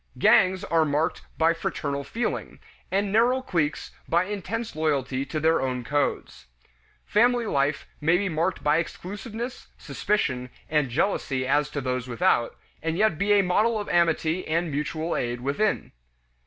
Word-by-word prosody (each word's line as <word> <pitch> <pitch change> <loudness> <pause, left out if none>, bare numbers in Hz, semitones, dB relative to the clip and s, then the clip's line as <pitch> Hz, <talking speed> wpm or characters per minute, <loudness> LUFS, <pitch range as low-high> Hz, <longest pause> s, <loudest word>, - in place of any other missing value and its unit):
Gangs 185 0 +4
are 165 -1 +2
marked 150 +1 0 0.2
by 165 +1 +4
fraternal 140 -3 -3
feeling, 230 +12 -3 0.3
and 200 +1 0
narrow 240 +5 +4
cliques 155 -9 -1 0.2
by 170 +2 +3
intense 210 +4 -4
loyalty 140 -4 0
to 155 - -2
their 160 +2 +3
own 125 -2 -2
codes. 145 - -2 0.6
Family 240 +2 +3
life 140 -6 0 0.2
may 165 +4 +4
be 200 +2 -1
marked 170 +2 -1
by 150 +1 +3
exclusiveness, 215 +8 -5
suspicion, 130 -12 -1 0.2
and 150 -3 +1
jealousy 135 - 0
as 145 +2 +2
to 145 -1 -4
those 125 -1 -2
without, 120 0 +1 0.3
and 165 +1 -2
yet 210 -6 +2
be 205 +1 +3
a 200 -1 +5
model 215 +5 +2
of 205 - -5
amity 170 0 +1
and 165 +1 0
mutual 155 +3 -2
aid 120 0 -2
within. 145 +11 0
165 Hz, 150 wpm, -26 LUFS, 140-200 Hz, 0.6 s, a